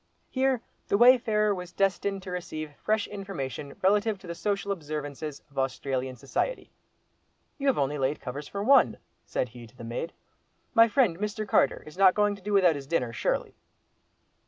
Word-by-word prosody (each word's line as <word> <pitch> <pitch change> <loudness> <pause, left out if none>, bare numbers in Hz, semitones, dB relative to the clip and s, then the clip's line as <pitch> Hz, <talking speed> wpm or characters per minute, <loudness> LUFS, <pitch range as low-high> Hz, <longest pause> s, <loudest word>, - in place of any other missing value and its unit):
Here 260 -2 +1 0.2
the 200 - +2
wayfarer 220 -3 +5
was 180 -2 -6
destined 195 0 0
to 185 - -7
receive 155 -4 -5
fresh 215 +6 0
information 160 -9 -6
relative 205 +2 +3
to 190 - -15
the 170 - -4
social 200 +2 -2
observances 150 -3 -5
of 140 - -4
Australian 130 0 -2
society. 135 - -3 0.9
"You 280 - -1
have 270 - +3
only 145 +1 0
laid 135 +3 0
covers 140 +4 -6
for 200 0 -4
one," 215 - +5 0.3
said 125 - -1
he 120 0 -11
to 125 - -22
the 115 - -9
maid. 120 +8 -4 0.6
"My 230 -1 +7
friend, 220 -8 +2
Mr. 210 +1 -3
Carter, - - +2
is 155 +5 -12
not 190 -2 +6
going 205 -1 +2
to 200 - -15
do 210 +2 -4
without 190 -4 +5
his 140 -2 -7
dinner 125 -7 0
surely?" - - -1
185 Hz, 175 wpm, -28 LUFS, 140-210 Hz, 0.9 s, My